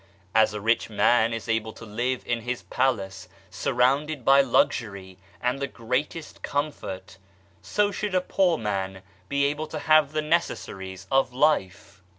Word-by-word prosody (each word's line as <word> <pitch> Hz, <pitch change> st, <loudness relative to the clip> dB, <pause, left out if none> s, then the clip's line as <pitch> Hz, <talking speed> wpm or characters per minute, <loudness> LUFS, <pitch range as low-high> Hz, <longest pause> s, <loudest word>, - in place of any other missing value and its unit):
As 110 Hz, -1 st, +4 dB
a -, -, -3 dB
rich 115 Hz, +3 st, +1 dB
man 115 Hz, +1 st, +3 dB
is 115 Hz, 0 st, -5 dB
able 110 Hz, -1 st, -1 dB
to 115 Hz, -, -11 dB
live 120 Hz, +4 st, -2 dB
in 120 Hz, -1 st, -1 dB
his 125 Hz, +2 st, -4 dB
palace 110 Hz, -8 st, -1 dB, 0.2 s
surrounded 135 Hz, +2 st, +1 dB
by 135 Hz, +1 st, +7 dB
luxury 100 Hz, -7 st, 0 dB, 0.2 s
and 125 Hz, +2 st, -1 dB
the 140 Hz, -, -1 dB
greatest 130 Hz, +8 st, -3 dB
comfort, 95 Hz, -11 st, -4 dB, 0.4 s
so 205 Hz, -1 st, +1 dB
should 205 Hz, -1 st, -3 dB
a 185 Hz, -, +3 dB
poor 180 Hz, -2 st, +2 dB
man 95 Hz, -4 st, -3 dB, 0.3 s
be 140 Hz, 0 st, +2 dB
able 150 Hz, +2 st, -1 dB
to 155 Hz, -, -6 dB
have 155 Hz, -1 st, +4 dB
the 155 Hz, 0 st, 0 dB
necessaries 95 Hz, -, -2 dB
of 135 Hz, -2 st, +2 dB
life. 100 Hz, -, 0 dB
125 Hz, 155 wpm, -26 LUFS, 105-150 Hz, 0.4 s, by